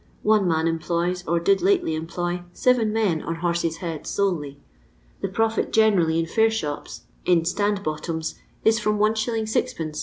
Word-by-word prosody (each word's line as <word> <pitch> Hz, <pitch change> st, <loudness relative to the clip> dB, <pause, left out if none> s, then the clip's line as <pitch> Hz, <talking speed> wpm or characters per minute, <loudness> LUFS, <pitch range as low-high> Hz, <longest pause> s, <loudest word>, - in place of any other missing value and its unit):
One 210 Hz, -3 st, +3 dB
man 160 Hz, -1 st, +1 dB
employs, 170 Hz, +2 st, -1 dB
or 170 Hz, +2 st, +2 dB
did 195 Hz, +4 st, +2 dB
lately 375 Hz, -, +2 dB
emplo}, 175 Hz, +2 st, -3 dB
seven 245 Hz, -4 st, +2 dB
men 210 Hz, -8 st, +1 dB
on 165 Hz, -, -3 dB
'horses' 170 Hz, -1 st, -1 dB
heads' 165 Hz, -3 st, -5 dB
solely. 155 Hz, -8 st, -1 dB, 0.6 s
The -, -, -1 dB
profit 225 Hz, +3 st, 0 dB
generally, 195 Hz, -8 st, +3 dB
in 165 Hz, -, +1 dB
fair 220 Hz, +7 st, +3 dB
shops, 145 Hz, -, -4 dB, 0.2 s
in 170 Hz, -2 st, +3 dB
'stand 205 Hz, +3 st, 0 dB
bottoms,' 160 Hz, 0 st, -3 dB, 0.3 s
if 225 Hz, +1 st, +4 dB
from 210 Hz, -1 st, +1 dB
Is. 215 Hz, +1 st, +4 dB, 0.4 s
6ci. 155 Hz, -2 st, -2 dB
175 Hz, 155 wpm, -24 LUFS, 165-210 Hz, 0.6 s, if